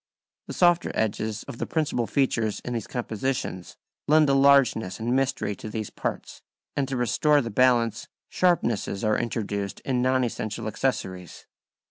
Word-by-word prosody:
The - - -6
softer 175 -1 +3
edges 110 0 -1
of 115 - -9
the - - -3
principal 145 -7 -1
features 115 -6 0
in 125 - -5
these 115 -4 -3
compositions 120 -5 -3 0.3
lend 155 0 +5
a - - +4
largeness 135 -8 +4
and 120 +3 0
mystery 135 -6 0
to 110 - -7
these 110 -1 -5
parts, - - -5 0.3
and 140 -2 0
to 135 -1 -3
restore 145 +5 +3
the 115 -4 -3
balance, 115 -1 +2 0.2
sharpnesses 120 - 0
are 110 -1 +2
introduced 100 -4 -3
in 125 -2 -1
non 130 0 +2
essential 110 -1 -3
accessories. 95 -6 -3
120 Hz, 150 wpm, -25 LUFS, 110-135 Hz, 0.3 s, lend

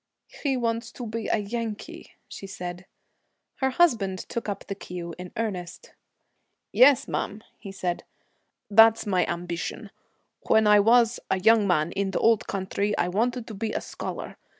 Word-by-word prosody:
'He 275 -3 0
wants 230 -1 -2
to 245 - -7
be 225 0 -4
a - - +2
Yankee,' 220 0 -5
she 195 - -9
said. 180 -1 -7 0.7
Her 265 - +1
husband 230 - +2
took 230 +3 -5
up 200 -1 -5
the - - -4
cue 175 -3 -7
in 180 0 -8
earnest. 185 -6 -5 0.8
'Yes, 260 +1 +6
ma'am,' 210 +2 -3 0.2
he 200 - -8
said, 180 -2 -3 0.7
'that's 225 +2 +6
my 185 -3 +1
ambition. 170 0 -4 0.6
When 220 0 +4
I 210 0 +6
was 235 +2 +4
a 190 - +1
young 220 +1 +4
man, 170 -2 +1
in 195 +1 -1
the 190 - -1
old 225 -2 +3
country, 200 +2 -2
I 175 - +1
wanted 235 +5 -1
to 225 - -8
be 215 +2 -3
a - - -2
scholar. - - -7
210 Hz, 160 wpm, -26 LUFS, 185-230 Hz, 0.8 s, Yes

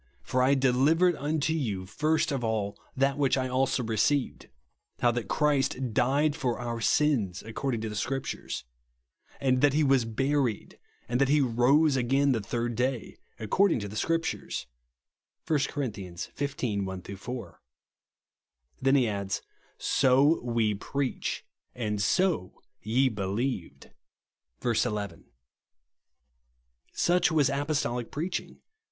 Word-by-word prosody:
For 130 - 0
I 135 +2 +4
delivered 140 +7 +3
unto 150 +1 0
you 105 -12 -2
first 155 - 0
of 135 -3 -2
all 110 -3 -1 0.2
that 135 +1 +1
which 140 -1 +3
I 130 0 0
also 130 0 +1
received, 115 +5 0 0.5
how 120 - +4
that 120 -4 -3
Christ 135 -4 +1
died 140 +5 +2
for 130 -7 -1
our 115 -1 -4
sins 115 - +1
according 115 +1 -3
to 110 - -3
the 105 - -6
Scriptures; 135 +5 -3 0.8
and 130 -1 +2
that 145 -1 +4
lie 155 - +3
ivas 135 -4 +3
buried, 135 0 -1 0.3
and 125 +2 0
that 135 - +3
he 150 +1 +4
rose 135 +4 +3
again 135 +3 +2
the 115 -4 0
third 120 +3 -2
day 125 0 -2 0.2
according 175 - +2
to 100 - -4
the 100 - -9
Scrip 165 +8 +1
tures," - - -4 0.8
(1 155 -2 +2
Cor. 145 -2 -2
XV. 105 +3 -4
1 95 -1 -5
4.) 120 +5 -7 1.2
Then 135 +1 +4
he 130 -4 +4
adds: 100 -2 -3 0.2
" - - -36
So 135 +4 +3
WE 115 -3 +1
PREACH, 135 +6 -3 0.3
AND 105 -4 -2
SO 160 - +1 0.3
YE 120 +7 +2
BELIEVED," 105 0 -3 0.7
(verse 120 -2 +1
11.) 100 -5 -4 1.7
Such 175 0 +2
was 145 -4 +3
apostolic 140 -4 -1
preaching. 170 +5 -4
130 Hz, 135 wpm, -28 LUFS, 110-145 Hz, 1.7 s, I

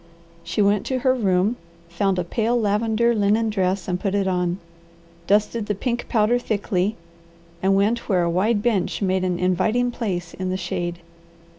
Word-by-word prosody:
She 210 - 0
went 200 0 +2
to 260 - 0
her 260 0 +3
room, 205 -1 +1 0.3
found 185 +3 0
a 180 - 0
pale 230 +7 0
lavender 220 +2 +1
linen 215 +1 +2
dress 190 -2 -1
and 180 -1 -1
put 195 0 -1
it 200 -1 +1
on, 180 -1 0 0.7
dusted 210 +2 +1
the 210 - -1
pink 240 +4 -3
powder 230 +2 +2
thickly, 205 -3 -1 0.7
and 195 +1 +3
went 215 +5 +1
where 180 -3 +3
a - - +1
wide 205 +4 +1
bench 210 -4 0
made 190 -1 +1
an 180 -1 0
inviting 215 +8 +1
place 180 -8 -4
in 185 0 -4
the 185 - -1
shade. 175 -1 -4
200 Hz, 170 wpm, -22 LUFS, 185-225 Hz, 0.7 s, her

